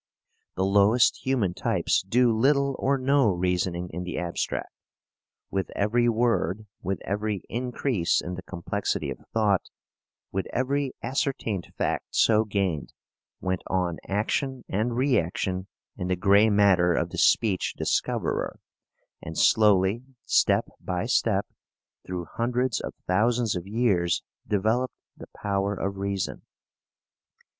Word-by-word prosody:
The 95 - +1
lowest 100 +5 +4
human 120 -9 +1
types - - +1
do 115 +4 +2
little 140 +3 +2
or 140 +1 +2
no 135 -2 +3
reasoning 90 -1 -1
in 90 - -4
the 90 0 -5
abstract. 85 -1 -3 0.8
With 95 -1 -1
every 120 +4 +2
word, 110 -4 +1 0.2
with 95 +1 -2
every 105 0 -2
increase 120 -5 0
in 90 - -4
the 90 - -6
complexity 95 +2 -3
of - - -7
thought, 105 -4 +2 0.7
with 95 0 -2
every 135 +2 0
ascertained 130 - -2
fact - - -2
so 110 0 +4
gained, 95 -7 -2 0.5
went 95 -1 -1
on 90 -3 -1
action 125 +6 -1
and 110 +5 -1
reaction 95 - 0 0.3
in 90 -3 -4
the 90 - +1
grey 100 +4 +5
matter 95 -4 +4
of - - -1
the - - -4
speech 100 -5 +2
discoverer, - - -1 0.6
and 80 0 -7
slowly, 105 +1 +4 0.2
step - - +3
by 90 +3 -3
step, 110 -4 +1 0.6
through 90 -2 -4
hundreds 120 +4 -1
of - - -6
thousands 115 +3 +2
of 90 +1 -5
years, 100 -6 +1 0.2
developed 110 +5 0 0.2
the - - -11
power 100 0 -1
of 100 0 -3
reason. 100 -1 -3
100 Hz, 125 wpm, -26 LUFS, 95-120 Hz, 0.8 s, grey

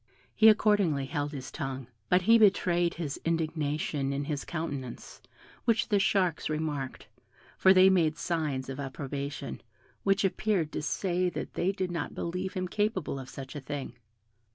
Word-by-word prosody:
He 220 - +7
accordingly 205 -10 +3
held 145 +2 -2
his 135 -3 -7
tongue: 135 -4 -4 0.2
but 180 0 +4
he 230 +4 +6
betrayed 175 -4 +3
his 155 -4 -4
indignation 155 -3 -1
in 140 +1 -2
his 145 -2 -3
countenance, 145 -7 -5 0.4
which 235 0 +2
the 205 -2 +3
sharks 185 -6 +1
remarked, 150 -4 -3 0.5
for 190 - +5
they 185 0 +7
made 165 -5 +3
signs 150 -6 -2
of 135 +1 -6
approbation, 140 +1 -5 0.4
which 195 0 +2
appeared 190 -5 0
to - - -3
say 180 +3 0
that - - -6
they 185 - +1
did 190 -2 -3
not 170 -4 -4
believe 180 +2 -3
him 185 -1 -1
capable 190 -7 -1
of 130 - -8
such 135 +1 -8
a 145 - -5
thing. 140 -2 -5
160 Hz, 155 wpm, -29 LUFS, 140-190 Hz, 0.5 s, He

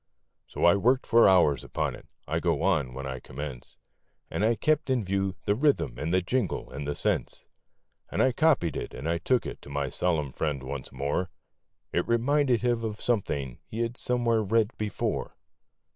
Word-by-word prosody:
So - - -1
I 85 - +7
worked 125 +6 +2
for 115 -3 +6
hours 75 -8 +4
upon - - -2
it - - -12 0.2
(I - - 0
go - - 0
on 65 -5 +1
when 70 0 -5
I 65 -1 -4
commence), 65 0 -8 0.5
And - - -1
I 115 +2 +3
kept 155 +5 +1
in 130 -4 +2
view 95 0 -1
the 100 - +3
rhythm 125 - +1
and 80 +2 -2
the 95 0 +2
jingle 115 0 -1
and 70 +1 -5
the 75 - -2
sense, - - -1 0.6
And - - -3
I 130 - +4
copied 125 - +2
it - - -5
and 85 +5 -2
took 125 +1 +2
it - - -6
to - - -12
my 70 -1 -2
solemn 80 -3 0
friend 75 -3 -2
once 65 0 -6
more 70 +7 -1 0.6
It - - 0
reminded 125 +1 +2
him 120 -2 +1
of 110 -1 -3
something 70 - -1
he 115 - -4
had 115 +1 -1
somewhere 120 -3 +1
read 110 +2 +1
before. 105 -2 -3
95 Hz, 185 wpm, -28 LUFS, 70-120 Hz, 0.6 s, I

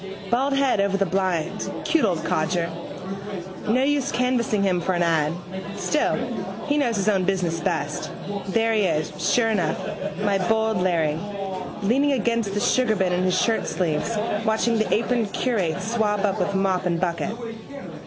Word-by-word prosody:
Baldhead 275 -1 +2
over 200 0 +2
the 195 - +2
blind. 185 -3 -1
Cute 325 -7 +3
old 180 -6 0
codger. 170 +1 0 1.0
No 250 +5 +3
use 280 -1 +1
canvassing 240 -5 +1
him 185 -3 +2
for 185 +2 0
an 175 -1 +2
ad. 160 -3 +2 0.4
Still 300 +9 +1 0.5
he 290 0 +2
knows 240 -5 +1
his 200 0 -1
own 195 -3 +3
business 180 -3 0
best. 160 -4 -2 0.4
There 225 +3 +2
he 215 - +3
is, 155 -3 0
sure 225 -2 +3
enough, 180 -7 +1 0.4
my 200 -1 +2
bold 220 -1 +2
Larry, 165 -4 +1 0.6
leaning 275 +7 +3
against 230 -5 0
the - - +1
sugarbin 215 -5 +2
in 180 0 +1
his 185 0 +2
shirtsleeves 210 +1 0
watching 220 +1 +2
the 215 -4 0
aproned 230 -1 +1
curate 190 -10 0
swab 215 -2 +1
up 195 - 0
with 200 - 0
mop 190 -1 +1
and 170 -1 0
bucket. 175 +4 -1
200 Hz, 155 wpm, -24 LUFS, 180-230 Hz, 1.0 s, Cute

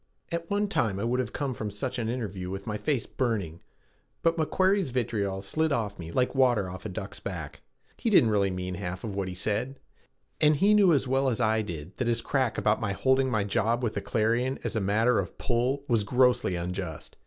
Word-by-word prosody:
At 170 0 -3
one 205 +1 +1
time 105 - 0
I - - -2
would 120 +2 0
have 130 - -2
come 140 -3 -2
from 110 -3 -4
such 105 +5 -3
an 115 -1 -1
interview 100 -7 -4
with 95 +1 -5
my 105 - -3
face 130 +2 -1
burning, 100 -10 -2 0.6
but 165 0 +3
McQuarrie's 185 +2 +2
vitriol 105 -6 -1
slid 160 +10 0
off 110 -7 -1
me 85 -1 -7
like 125 +7 +1
water 125 -7 +3
off 95 0 -7
a - - -6
duck's 95 +1 -6
back. 85 -7 -6 0.4
He 230 - 0
didn't 125 - +5
really 100 -2 +2
mean 90 0 -4
half 90 -1 -5
of 110 - -4
what 95 -1 -2
he 90 - -5
said, 115 +8 -2 0.6
and 150 0 +5
he 200 +8 +4
knew 200 -4 +6
as 140 -4 +2
well 135 +1 +2
as 120 - -1
I 110 -2 +2
did 85 -2 -7
that 130 -1 -1
his 115 -1 +1
crack 130 -5 0
about 110 +2 +2
my 105 -3 -1
holding 130 +5 +2
my 110 -4 +1
job 115 +4 0
with 115 - 0
the - - -2
Clarion 120 +4 0
as - - -2
a - - +2
matter 110 +4 +2
of 95 - -4
pull 130 +3 0
was 115 -4 +2
grossly 125 -3 +3
unjust. 90 -2 -5
115 Hz, 220 wpm, -28 LUFS, 100-130 Hz, 0.6 s, knew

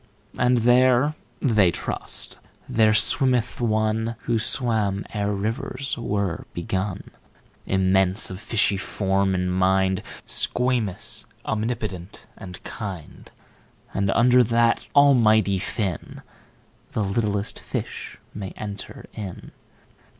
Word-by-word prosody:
19And 125 0 +3
there 125 +3 +4 0.3
(they 110 -8 +4
trust) - - -4 0.3
there 110 -1 +4
swimmeth 125 +3 +3
One20Who 110 0 0
swam 110 -4 +1
ere 105 -1 -1
rivers 125 +7 -3
were 100 -6 -2
begun,21Immense, 95 +1 -1
of 95 - -6
fishy 105 -2 +1
form 95 0 0
and 90 0 0
mind,22Squamous, 95 +4 0 0.2
omnipotent, 110 -4 -3
and 90 -3 -9
kind;23And 95 +1 -6
under 125 +2 +6
that 115 0 +2
Almighty 110 -8 +5
Fin,24The 100 +1 -6
littlest 105 -3 -1
fish - - -5 0.2
may 100 -3 -6
enter 100 -2 -7
in. 100 -5 -7
105 Hz, 85 wpm, -24 LUFS, 95-120 Hz, 0.3 s, under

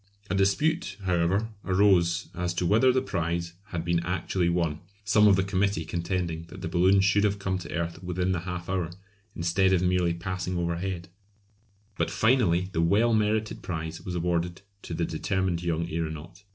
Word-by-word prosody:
A - - +1
dispute, 100 - +1
however, 90 +4 +1
arose 95 -2 +3
as 90 0 -2
to 90 - 0
whether 115 +8 +5
the 130 +1 +1
prize 85 -3 -2
had 85 -5 -5
been 85 -1 +2
actually 90 0 -1
won, 85 -3 0 0.3
some 105 +1 +5
of 100 - +6
the 95 - +2
committee 100 -2 0
contending 85 -1 -2
that 95 +2 -11
the - - -3
balloon 95 +2 +4
should 95 +1 +3
have 100 -1 +2
come 95 -1 -2
to 85 - -8
earth 85 +2 -3
within 90 +1 -1
the 90 - 0
half 90 0 -5
hour, 90 -3 -1 0.5
instead 95 +3 +2
of 90 -1 +2
merely 90 -2 +2
passing 90 +1 -3
overhead; 85 +1 -2 0.9
but - - +1
finally 110 -8 +3
the 80 - 0
well 105 +8 +3
merited 110 0 0
prize 80 -1 -5
was 90 - -5
awarded 85 +1 -1 0.2
to - - -6
the - - 0
determined 95 -3 -1
young 85 -1 -1
aeronaut. 80 +2 -5
90 Hz, 175 wpm, -27 LUFS, 85-95 Hz, 0.9 s, of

